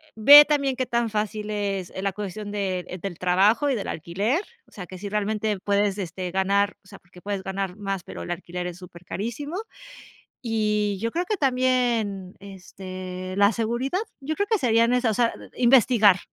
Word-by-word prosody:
ve 285 +7 +10
también 280 -3 0
qué 255 - -1
tan 235 -1 0
fácil 210 0 -3
es 200 -3 -2
e 190 - -4
la 195 0 0
cuestión 205 +1 -6
de 185 -3 -3
del 195 -4 -5
trabajo 195 +10 +3
y 270 - +1
del 205 - -4
alquiler, 200 - -1 0.3
o - - -26
sea, 180 - -8
que 185 - -9
si 200 +3 -6
realmente 210 +1 -1
puedes, 200 0 +1
este, 180 -1 -4
ganar 200 +2 +1
o - - -22
sea, - - -13
porque 180 +1 -18
puedes 200 -1 -4
ganar 190 -1 -4
más, 195 -3 -4
pero - - -8
el - - -5
alquiler 175 0 -5
es 175 -1 -7
súper 180 -1 -13
carísimo. 240 - -5 0.9
Y 210 -4 0
yo 230 +3 -2
creo 350 +2 -1
que 420 +3 -1
también, 245 - 0
este, 185 -1 -8
la 200 +1 +5
seguridad, 235 - -1 0.2
yo 290 +3 -3
creo 405 +4 -1
que 445 - +3
serían 230 - +3
esas, 250 -2 +2
o - - -1
sea, 235 - +2 0.2
investigar, 235 -5 +5
205 Hz, 190 wpm, -24 LUFS, 190-235 Hz, 0.9 s, ve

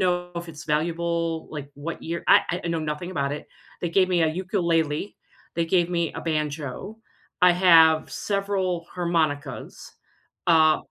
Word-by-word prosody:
know 175 -1 0
if 170 0 -5
it's 155 -2 -9
valuable. 165 +1 -1
Like 145 -2 -6
what 150 +4 -6
year 170 +1 -4
I 175 +2 +4
I - - -2
know 165 -1 -1
nothing 155 +4 -4
about 140 -4 -1
it. 150 - -6 0.3
They 175 - -2
gave 185 +1 +3
me 175 -2 +2
a 160 - +4
ukulele. 170 -2 -1 0.4
They 170 -1 0
gave 175 0 +2
me 170 -2 0
a - - -5
banjo. 155 - -3 0.4
I 180 - +7
have 165 -3 +5
several 195 -4 -1
harmonicas, 155 -6 -2 0.6
uh, 160 -2 +5
170 Hz, 155 wpm, -25 LUFS, 155-180 Hz, 0.6 s, I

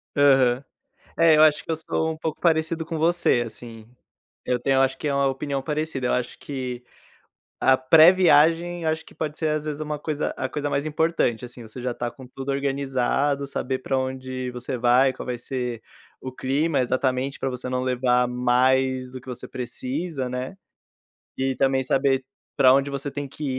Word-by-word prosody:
Aham. 135 -3 +4 0.5
É, 165 -2 +6
eu 155 - +6
acho 155 -1 +4
que - - -7
eu 160 - 0
sou 160 0 -2
um - - -8
pouco 160 -1 -4
parecido 160 -1 +1
com 165 -1 -4
você, 165 -6 +2
assim. 115 -1 -11 0.6
Eu 125 -1 0
tenho, 135 +1 +1
eu - - +4
acho, 135 0 +1
que - - -5
é 140 - 0
uma 140 0 +2
opinião 135 +1 -2
parecida, 150 -2 -2
eu - - +1
acho 125 0 -2
que 130 -3 -5 0.8
a 130 - +5
pré-viagem, 165 +3 +5
acho 160 +1 -1
que - - -17
pode 155 -1 -4
ser 160 - 0
às 155 0 -1
vezes 150 0 -4
uma 150 0 -3
coisa 150 0 -2
a 130 - -2
coisa 145 +1 -3
mais 140 +1 -1
importante, 155 -6 0
assim, 120 0 -11
você 110 +3 -10
já 125 0 -2
tá 120 0 -4
com 130 0 -13
tudo 135 +2 -8
organizado, 140 0 0
saber 130 -1 -3
pra 135 +1 -1
onde 130 -1 -4
você 125 +1 -5
vai, 125 +2 +4
qual - - -8
vai 125 -1 -3
ser 125 -2 -4 0.4
o 130 - -6
clima 140 +5 0
exatamente, 130 +1 -1
pra 135 - -1
você 125 0 -6
não 125 0 -1
levar 125 -1 +2
mais 130 +1 +1
do 130 - -7
que 130 - -21
você 125 - -7
precisa, 130 +3 -4
né. 125 +8 -5 0.8
E 135 0 0
também 135 -1 +2
saber 135 0 +1 0.3
pra 130 -2 +6
onde 140 +1 +1
você 140 +1 -4
tem 145 0 -5
que 150 +3 -8
135 Hz, 190 wpm, -24 LUFS, 125-150 Hz, 0.8 s, É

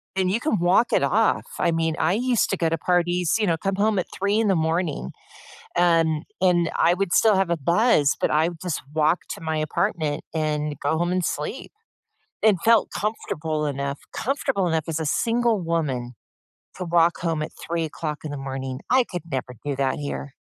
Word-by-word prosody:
and 185 -1 +1
you 215 +5 +1
can 235 - 0
walk 180 +7 +3
it - - +4
off. - - +2 0.2
I 170 -2 +2
mean, 160 -1 0
I 165 +3 +2
used 245 0 +1
to 195 - 0
go 165 -2 +1
to 165 - 0
parties, 175 -2 +1
you 210 - +1
know, 165 -1 +2
come 195 +3 -2
home 210 0 +1
at 180 - 0
3:00 200 +2 0
in 225 - +2
the 190 - +3
morning 160 - -1 0.6
and 165 -3 +3 0.2
and 175 -2 +3
I 175 +1 +3
would 195 -2 -1
still 220 -3 +5
have 190 -2 +1
a 170 - +1
buzz, 170 - +3
but - - +1
I 155 +2 +3
would 170 -2 -11
just 180 -4 -3
walk 155 +2 +2 0.2
to - - -13
my 160 -1 -2
apartment 155 -1 -1
and 150 -1 -1
go 150 +3 +1
home 175 +1 0
and 180 -1 0
sleep - - -4 0.7
and 215 -4 +4
felt 230 -2 +4
comfortable 160 -7 -2
enough 140 0 -3
comfortable 265 -6 -1
enough 160 -2 0
as 165 0 -2
a - - -2
single 230 +5 +1
woman 140 -8 -2 0.6
to 180 - -4
walk 170 0 +3
home 165 -3 -1
at 155 - -4 0.2
3:00 160 -2 -3
in 150 - -4
the 145 - -4
morning. 135 -1 -5
I 255 -1 +5
could 175 -2 -4
never 130 -1 -3
do 145 -1 -1
that 135 -1 +1
here. 140 -1 -5
170 Hz, 200 wpm, -24 LUFS, 155-190 Hz, 0.7 s, still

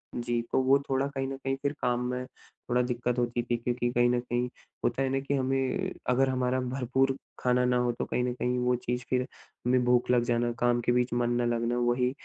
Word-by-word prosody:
जी, 120 -1 -1
तो - - +3
वो 135 +2 +5
थोड़ा 135 +1 +1
कहीं 135 -1 -3
न 135 0 -4
कहीं 135 0 0
फिर 140 0 0
काम 120 0 +1
में 125 0 -3
थोड़ा 125 0 -4
दिक्कत 125 0 -1
होती 120 0 0
थी 120 0 0
क्योंकि 120 +1 -1
कहीं 120 0 +3
न 125 0 +2
कहीं 120 0 -1 0.4
होता 120 +3 +1
है 135 - +1
ना 135 0 +1
कि 140 +1 -3
हमें 135 +8 0 0.2
अगर 130 +1 +3
हमारा 130 0 0
भरपूर 130 +1 0 0.2
खाना 125 0 +2
ना 125 0 +2
हो, 125 0 +2
तो 120 - -4
कहीं 125 - -1
न 125 -1 -1
कहीं 125 0 -1
वो 125 0 +2
चीज़ 125 0 -3
फिर 125 -1 +2 0.5
हमें 125 0 +3
भूख 125 0 +3
लग 120 -1 +4
जाना, 120 0 +1
काम 120 0 +2
के 120 - +1
बीच 125 0 +1
मन 120 0 +1
ना - - +1
लगना। 120 +1 0
वही 120 +1 +2
125 Hz, 230 wpm, -29 LUFS, 120-130 Hz, 0.5 s, वो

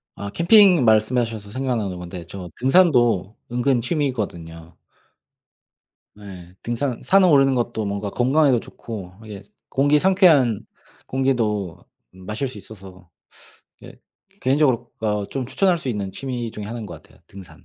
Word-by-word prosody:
아 100 0 -6
캠핑 180 - +5
말씀하셔서 110 -1 +1
생각나는 115 -7 -2
건데 90 0 -8
저 90 0 -8
등산도 120 - +3 0.2
은근 125 +1 +1
취미거든요. 100 - -4 1.4
네 95 -4 -12
등산 120 +1 -3
산에 195 0 +4
오르는 135 -5 +4
것도 120 -3 -2
뭔가 100 0 -3
건강에도 130 +1 +2
좋고 100 -7 -9
이게 105 -3 -9
스 100 - -21 0.2
공기 145 +2 +3
상쾌한 155 - +3 0.4
공기도 110 -9 -1 0.3
마실 105 +8 -5
수 125 - -11
있어서 95 -3 -13 0.8
예 - - -11 0.5
개인적으로 130 -3 +1
그러니까 105 -1 -1
어 100 - -5
좀 130 +1 -5
추천할 180 +6 +1
수 135 - -6
있는 100 -5 -3
취미 120 +1 -5
중의 105 -1 -8
1 115 +2 -6
인 105 - -7
것 - - -10
같아요, - - -24
등산. 90 -5 -14
115 Hz, 305 characters per minute, -22 LUFS, 100-135 Hz, 1.4 s, 캠핑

